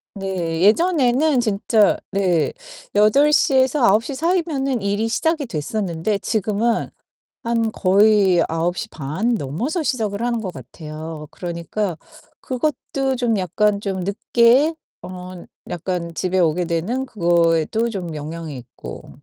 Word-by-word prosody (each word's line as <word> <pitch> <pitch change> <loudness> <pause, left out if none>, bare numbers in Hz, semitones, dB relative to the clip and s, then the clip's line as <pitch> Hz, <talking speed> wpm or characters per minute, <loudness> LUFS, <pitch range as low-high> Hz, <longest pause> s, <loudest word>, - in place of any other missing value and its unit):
네, 180 -4 -3
예전에는 280 - +3
진짜 215 -1 +2
네. 180 -5 +1 0.4
8:00에서 265 +4 +4
9:00 225 +7 +3
사이면은 300 - 0
일이 205 +3 0
시작이 315 +5 0
됐었는데 185 +2 -2
지금은 220 +2 0 0.5
한 230 -1 0
거의 195 -2 +4
9:30 165 - -2
넘어서 225 - -2
시작을 220 -6 -1
하는 240 -1 0
거 205 -4 -4
같아요. 155 +2 -8
그러니까 170 +1 -4 0.4
그것도 270 0 -2
좀 235 -4 +1
약간 200 +3 +1
좀 195 -2 -3
늦게 235 - +3 0.3
어 180 -1 -9 0.3
약간 175 -1 -3
집에 185 0 0
오게 175 +1 +2
되는 185 +11 -1
그거에도 175 +1 +1
좀 180 -7 -5
영향이 155 0 -6
있고. 115 - -10
200 Hz, 230 characters per minute, -21 LUFS, 170-240 Hz, 0.5 s, 8:00에서